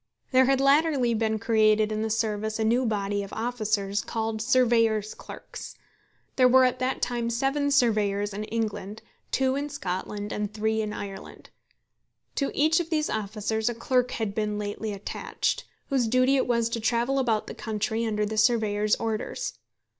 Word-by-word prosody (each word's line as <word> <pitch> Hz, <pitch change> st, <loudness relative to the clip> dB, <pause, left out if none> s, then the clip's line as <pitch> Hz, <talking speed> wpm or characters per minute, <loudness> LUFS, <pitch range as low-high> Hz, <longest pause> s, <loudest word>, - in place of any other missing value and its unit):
There 260 Hz, 0 st, +5 dB
had 270 Hz, 0 st, +3 dB
latterly 275 Hz, -3 st, +3 dB
been 220 Hz, -1 st, 0 dB
created 215 Hz, -1 st, +3 dB
in 215 Hz, 0 st, -1 dB
the 220 Hz, -, -1 dB
service 220 Hz, -1 st, -1 dB
a 220 Hz, -, 0 dB
new 240 Hz, +3 st, +2 dB
body 205 Hz, -1 st, -1 dB
of 200 Hz, -, -7 dB
officers 215 Hz, -4 st, -1 dB
called 220 Hz, -1 st, -3 dB
surveyors' 230 Hz, -4 st, +2 dB
clerks. -, -, -10 dB, 0.6 s
There 255 Hz, -1 st, +6 dB
were 260 Hz, +1 st, +6 dB
at 255 Hz, 0 st, 0 dB
that 255 Hz, +1 st, -1 dB
time 240 Hz, -1 st, -1 dB
seven 270 Hz, +4 st, 0 dB
surveyors 210 Hz, -6 st, +2 dB
in 210 Hz, +2 st, -4 dB
England, 215 Hz, -1 st, -4 dB, 0.3 s
two 265 Hz, 0 st, +1 dB
in 285 Hz, +1 st, -2 dB
Scotland, 205 Hz, -5 st, -4 dB
and 210 Hz, -1 st, -3 dB
three 220 Hz, +1 st, 0 dB
in 215 Hz, -1 st, -3 dB
Ireland. 200 Hz, -2 st, -8 dB, 0.9 s
To 275 Hz, -, +1 dB
each 310 Hz, +3 st, +3 dB
of 335 Hz, -2 st, -3 dB
these 310 Hz, -2 st, 0 dB
officers 215 Hz, +2 st, -1 dB
a 240 Hz, -, -3 dB
clerk 250 Hz, +1 st, +1 dB
had 220 Hz, -3 st, -3 dB
been 210 Hz, 0 st, -1 dB
lately 210 Hz, +1 st, -4 dB
attached, 200 Hz, 0 st, -3 dB, 0.2 s
whose 260 Hz, -5 st, +1 dB
duty 255 Hz, +3 st, +3 dB
it 265 Hz, -, +1 dB
was 235 Hz, -2 st, +2 dB
to 230 Hz, -, -2 dB
travel 240 Hz, +4 st, +1 dB
about 225 Hz, -5 st, +1 dB
the -, -, -7 dB
country 220 Hz, +1 st, -2 dB
under 210 Hz, -2 st, 0 dB
the 215 Hz, +1 st, -4 dB
surveyor's 215 Hz, -2 st, +2 dB
orders. 225 Hz, -, -3 dB
225 Hz, 170 wpm, -26 LUFS, 210-255 Hz, 0.9 s, There